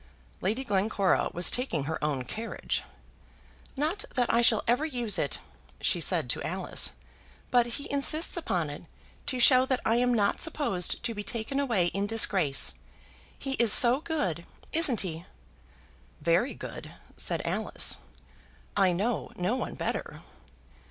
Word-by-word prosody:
Lady 220 +8 -1
Glencora 200 -3 +1
was 175 +1 +3
taking 245 - -2
her 155 +2 -5
own 145 -4 -1
carriage. 225 - -4 1.0
"Not 320 +9 -1
that 245 -2 +1
I 235 - +4
shall 230 -2 +3
ever 245 +6 +2
use 245 -8 0
it," - - -2 0.4
she - - 0
said - - +1
to - - -2
Alice, - - -1 0.6
"but 245 -1 +3
he 285 - -7
insists 305 +4 +4
upon 180 - -2
it, 145 - -10 0.4
to 255 -3 0
show 255 +1 +6
that 260 -1 0
I 225 - +2
am 245 0 +2
not 205 -4 +1
supposed 280 - 0
to 235 -1 -1
be 205 - -5
taken 230 +6 -3
away 235 -11 +1
in 200 +1 -1
disgrace. 195 -10 +3 0.6
He 270 - -5
is 235 -3 +5
so 245 +4 +8
good; 185 - -3 0.3
isn't 300 - +4
he?" 170 -2 -6 0.9
"Very 170 - +1
good," - - -9 0.2
said - - -2
Alice. - - 0 0.8
"I 190 -3 +3
know 210 +6 -2
no 180 +7 -1
one - - -4
better." - - -5
230 Hz, 145 wpm, -28 LUFS, 185-260 Hz, 1.0 s, so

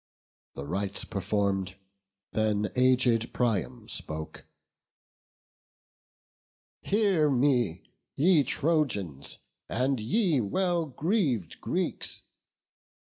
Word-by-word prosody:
The 70 - -6
rites 100 +5 -3
perform'd, 100 -2 -1 0.6
then 105 -1 0
aged 125 -2 +3
Priam 115 0 -1
spoke: 80 -7 -5 2.4
"Hear 195 -7 +2
me, 125 - +2 0.3
ye 160 0 +4
Trojans, 120 - -1 0.3
and 130 +1 0
ye 150 - +2
well 175 - 0
greav'd 140 - -1
Greeks! - - -2
120 Hz, 75 wpm, -28 LUFS, 100-150 Hz, 2.4 s, ye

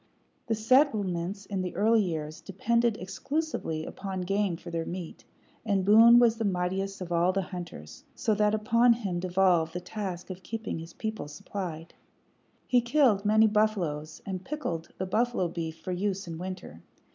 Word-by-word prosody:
The 225 - +1
settlements 205 - +2
in 195 -2 -3
the 180 -1 -4
early 220 +2 +4
years 155 -4 -4
depended 230 +4 +1
exclusively 190 - -3
upon 190 -1 -5
game 195 -1 0
for 170 - -10
their 165 -1 -1
meat, 175 0 -7 0.4
and 200 -4 +1
Boone 225 +3 +8
was 235 -2 +5
the 225 - -2
mightiest 195 0 -1
of 175 -1 -6
all 170 +2 +3
the 195 0 -1
hunters, 175 - -8
so 220 - +1
that 210 0 +2
upon 230 +3 +4
him 200 -7 -3
devolved 180 -3 +2
the 180 - -3
task 185 -1 -5
of 185 0 -8
keeping 225 -3 -4
his 165 +1 -9
people 220 -7 -4
supplied. 165 +1 -6 0.7
He 250 -1 +3
killed 235 -5 +3
many 215 +1 +5
buffaloes, 190 -8 0
and 190 -2 -4
pickled 180 - -4
the 190 - -2
buffalo 220 0 +1
beef 165 -1 -5
for 185 - -5
use 195 +1 -2
in 165 -1 -6
winter. 180 - -7
195 Hz, 165 wpm, -28 LUFS, 175-220 Hz, 0.7 s, Boone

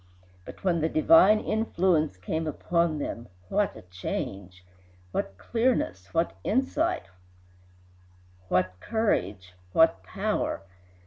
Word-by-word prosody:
But - - -11
when 175 -4 +2
the 160 - +1
divine 175 +7 +6
influence 180 - +1
came 160 - -3
upon 170 +1 0
them, 120 -4 -5 0.2
what 205 -1 +1
a - - -11
change! 90 0 -6 0.5
What 95 +1 -3
clearness, 105 - -1
what 165 - +1
insight, 305 - 0 1.5
what 90 0 +1
courage, 100 - -1 0.2
what 165 0 +4
power! 210 - -2
160 Hz, 105 wpm, -27 LUFS, -, 1.5 s, divine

